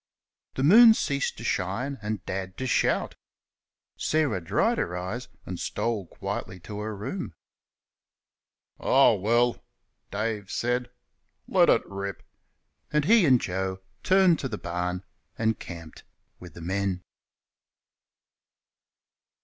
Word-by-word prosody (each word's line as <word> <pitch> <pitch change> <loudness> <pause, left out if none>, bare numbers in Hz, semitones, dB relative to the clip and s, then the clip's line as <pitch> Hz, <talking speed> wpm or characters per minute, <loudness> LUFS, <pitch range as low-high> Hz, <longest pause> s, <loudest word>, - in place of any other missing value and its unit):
The 130 - -1
moon 220 +8 +9
ceased 140 -7 -1
to - - -8
shine, 120 +10 -2
and 105 -3 -4
Dad 95 -1 -4
to 130 - -3
shout. 125 - +1 0.8
Sarah 145 - 0
dried 85 - +1
her 90 +1 -2
eyes 105 +8 -4 0.2
and 90 -1 -6
stole 105 -3 -2
quietly 95 - -5
to 105 +3 -7
her 105 0 -4
room. 100 - -5 1.4
"Ah, 135 -2 +5
well!" 120 +4 +1 0.5
Dave 105 -1 -3
said, 125 +1 -1 0.6
"let - - +4
it - - +4
rip," 100 -1 -6 0.7
and 150 -1 +2
he 215 -3 +6
and 130 -3 +6
Joe 95 0 -3 0.2
turned 185 -3 +4
to 135 - -2
the 105 - -4
barn 90 +1 -3 0.3
and 110 -1 0
camped 85 -2 -9 0.4
with 90 -3 -12
the 85 - -9
men. 95 +1 -2
105 Hz, 120 wpm, -27 LUFS, 95-125 Hz, 1.4 s, moon